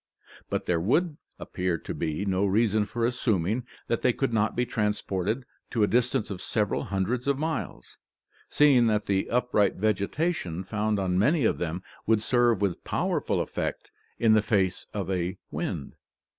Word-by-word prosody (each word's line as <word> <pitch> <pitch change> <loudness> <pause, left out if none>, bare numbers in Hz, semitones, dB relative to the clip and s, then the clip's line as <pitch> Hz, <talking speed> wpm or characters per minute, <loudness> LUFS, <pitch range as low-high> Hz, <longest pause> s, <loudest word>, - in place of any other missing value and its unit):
But - - -2
there 85 -2 +1
would 150 - +1 0.2
appear 90 -2 -2
to - - -6
be 80 +4 -2
no 95 0 +1
reason 105 +1 +2
for 115 +3 -1
assuming 115 -1 0 0.2
that 115 - -1
they 125 - +4
could 135 -2 -1
not 110 -1 +1
be 125 - +1
transported 105 +1 -1 0.2
to 115 -4 +1
a - - +4
distance 120 -2 +1
of 95 - -5
several 105 -3 -1
hundreds 110 +7 -1
of 140 -1 +2
miles, 155 - -4 0.5
seeing 135 -5 +5
that 105 -1 +1
the 95 -1 0
upright 120 -5 +2
vegetation 105 - -1
found 105 +2 -1
on 95 -2 0
many 140 - +3
of - - +1
them 85 +2 -3 0.2
would 110 -1 +3
serve 120 -3 +3
with 95 -4 -1
powerful - - 0
effect - - -4 0.3
in 115 -2 +4
the 110 - +5
face 95 -4 0
of 100 -2 -3
a 90 +1 -1
wind. 70 - -4
105 Hz, 165 wpm, -27 LUFS, 95-120 Hz, 0.5 s, seeing